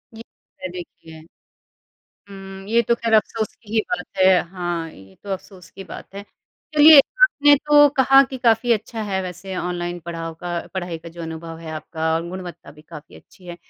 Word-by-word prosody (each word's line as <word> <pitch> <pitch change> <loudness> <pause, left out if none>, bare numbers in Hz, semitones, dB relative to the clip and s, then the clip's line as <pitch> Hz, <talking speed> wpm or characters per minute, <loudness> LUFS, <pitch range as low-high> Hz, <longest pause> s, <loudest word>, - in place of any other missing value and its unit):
ये 225 - -10
तो - - -44
है, 185 - -3
देखिए। 165 -2 -11 1.1
हुँ, 195 0 -11
ये 235 +1 +3
तो 235 - +4
खैर 230 -1 -1
अफ़सोस 220 0 0
की 220 -2 -15
ही 220 - +3
बात - - -8
है 185 -1 +5
हाँ, 175 -3 -4
ये 95 -5 -17
तो 200 - -9
अफ़सोस 185 -1 -9
की 195 0 -11
बात - - -11
है। 200 0 -8 0.5
चलिए 300 0 +9 0.2
आपने 290 -12 +6
तो 290 0 +5
कहा 270 +1 +6
कि 260 - -5
काफ़ी 235 0 +2
अच्छा 220 +1 -3
है 195 -2 -2
वैसे 185 +1 -7
ऑनलाइन 175 0 -4
पढ़ाओ 165 -1 -5
का 175 - -4 0.2
पढ़ाई 175 -3 -4
का 170 +1 -11
जो 170 0 -10
अनुभव 165 0 -7
है 165 -1 -9
आपका 160 +1 -3
और 165 +1 -3
गुणवत्ता 180 -4 -9
भी 150 +1 -18
काफ़ी 155 -2 -13
अच्छी 180 - -19
है। 175 0 -8
185 Hz, 195 wpm, -21 LUFS, 170-225 Hz, 1.1 s, चलिए